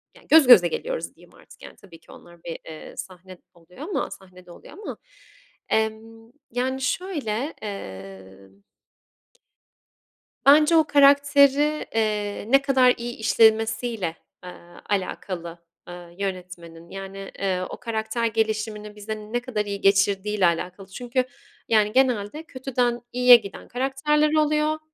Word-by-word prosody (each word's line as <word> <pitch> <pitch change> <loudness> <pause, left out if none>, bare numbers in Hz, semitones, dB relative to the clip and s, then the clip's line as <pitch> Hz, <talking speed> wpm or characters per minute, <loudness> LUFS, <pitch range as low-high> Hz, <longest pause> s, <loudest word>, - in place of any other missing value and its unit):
yani, - - -20
göz 310 -4 +7
göze 200 -9 +8
geliyoruz, - - -5
diyeyim - - -20
artık, - - -19
yani, - - -11
tabii 170 -5 -16
ki - - -19
onlar 170 -1 -16
bir, 165 - -6
eee, 155 -1 -10
sahne 185 0 -9
eee, 180 - -12
oluyor 170 +3 -20
ama 365 +5 -3
sahnede 180 -2 -14
oluyor - - -14
ama. 420 - -8 0.7
Emm, 225 +1 -3 0.2
yani, 260 +2 -2
şöyle, 285 - -2
eee 95 - -8 2.1
bence 300 +3 +6
o 320 - +6
karakteri, 285 +1 +4
eee, 210 -2 -1
ne 275 0 +6
kadar 260 -3 +4
iyi 240 +1 -6
işlemesiyle, 220 -4 +2 0.3
aaa, 175 -1 -13
alakalı, 180 -3 -4 0.3
aaa, 175 -1 -10
yönetmenin, 175 -3 -7
yani, 195 0 -8
eee, 190 -2 -1
o - - -7
karakter 225 0 -3
gelişimini 215 -1 -2
bize 210 +1 -6
ne 215 +3 -4
kadar 240 -4 -3
iyi 200 -1 -5
geçirdiğiyle 200 0 +2
alakalı 180 +3 -2
çünkü, 245 +5 -2 0.4
yani, 215 -2 +3
genelde 255 +2 0
kötüden 255 -5 -2
iyiye 250 0 +8
giden 200 -4 -3
karakterler 300 +4 0
oluyor, 305 0 +1
220 Hz, 130 wpm, -24 LUFS, 190-260 Hz, 2.1 s, göze